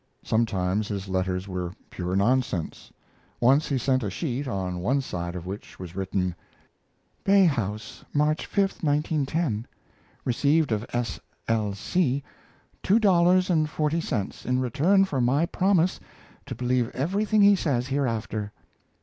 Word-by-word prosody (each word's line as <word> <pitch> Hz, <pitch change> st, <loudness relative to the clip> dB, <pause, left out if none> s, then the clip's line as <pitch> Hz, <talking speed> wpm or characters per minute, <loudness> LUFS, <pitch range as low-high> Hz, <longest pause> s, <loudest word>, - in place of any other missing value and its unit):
Sometimes 105 Hz, -3 st, 0 dB
his 100 Hz, -2 st, -4 dB
letters 95 Hz, 0 st, -1 dB
were 90 Hz, -2 st, -4 dB, 0.2 s
pure 90 Hz, 0 st, -3 dB
nonsense. 115 Hz, -, 0 dB, 0.5 s
Once 135 Hz, +6 st, +4 dB
he 140 Hz, -, 0 dB
sent 130 Hz, +1 st, +1 dB
a 105 Hz, -, -2 dB
sheet, 135 Hz, -, -3 dB
on 95 Hz, -6 st, -3 dB
one 125 Hz, +10 st, +1 dB
side 85 Hz, -9 st, -4 dB
of 90 Hz, -1 st, -6 dB
which 95 Hz, +3 st, -8 dB
was 90 Hz, -1 st, -9 dB
written: 95 Hz, -1 st, -1 dB, 0.9 s
BAY 195 Hz, -1 st, +5 dB
HOUSE, 110 Hz, -, -2 dB
March 150 Hz, +1 st, +1 dB
s, -, -, -16 dB, 0.2 s
1910. 145 Hz, -5 st, 0 dB, 0.6 s
Received 145 Hz, +4 st, +2 dB
of 110 Hz, +2 st, -1 dB
S. 120 Hz, -6 st, -2 dB, 0.3 s
L. 110 Hz, -3 st, 0 dB
C. 140 Hz, -, 0 dB, 0.6 s
Two 200 Hz, -, +3 dB
Dollars 185 Hz, -3 st, +4 dB
and 155 Hz, -3 st, +2 dB
Forty 155 Hz, +2 st, 0 dB
Cents 105 Hz, -, -3 dB
in 125 Hz, 0 st, 0 dB
return 155 Hz, +10 st, +3 dB
for 140 Hz, -9 st, -1 dB
my 135 Hz, +7 st, +3 dB
promise 185 Hz, 0 st, +2 dB, 0.5 s
to -, -, -5 dB
believe 125 Hz, 0 st, 0 dB
everything 205 Hz, +8 st, +2 dB
he 200 Hz, 0 st, +7 dB
says 130 Hz, -8 st, -1 dB
hereafter. 115 Hz, -6 st, -2 dB
125 Hz, 140 wpm, -26 LUFS, 100-155 Hz, 0.9 s, he